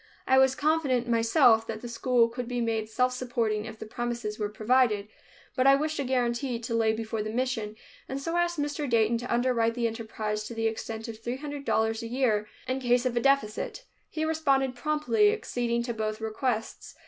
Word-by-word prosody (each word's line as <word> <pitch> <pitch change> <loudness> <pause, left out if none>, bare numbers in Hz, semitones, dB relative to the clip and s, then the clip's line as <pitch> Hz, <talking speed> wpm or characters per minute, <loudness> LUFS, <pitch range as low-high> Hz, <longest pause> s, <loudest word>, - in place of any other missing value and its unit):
I 265 0 +5
was 265 0 +4
confident, 285 -5 +1
myself, 230 0 +4
that 220 -1 -5
the 240 - -6
school 235 0 +2
could 240 +1 -5
be 245 0 -2
made 225 -2 -1
self 250 +3 +1
supporting 235 -4 -1
if 220 -1 -8
the - - -7
premises 235 -1 -4
were 210 -1 -1
provided, 215 -1 +2 0.5
but 255 0 +3
I 275 - +8
wished 305 +2 -1
a - - +1
guarantee 245 -1 0
to 230 +1 -5
lay 225 -1 +3
before 220 0 -3
the 215 - -3
mission, 225 -3 -2 0.3
and 270 - -3
so 330 +4 -3
asked 345 0 +1
Mr. 290 -1 -2
Dayton 230 0 +3
to 245 - -6
underwrite 235 -1 +2
the 240 -1 -1
enterprise 220 -2 -3
to 235 - -7
the 225 0 -1
extent 225 0 -3
of 225 -1 -7
three 240 +3 -4
hundred 290 0 -6
dollars 220 0 +1
a 230 - -5
year, 230 -4 +1 0.2
in 260 +1 -1
case 245 0 +2
of 250 -1 0
a - - +3
deficit. 275 - 0 0.2
He 315 0 -2
responded 275 -5 +1
promptly, 305 - +2
acceding 240 - -1
to 235 -1 -3
both 215 -1 -3
requests. 220 +1 -3
240 Hz, 200 wpm, -28 LUFS, 225-265 Hz, 0.5 s, I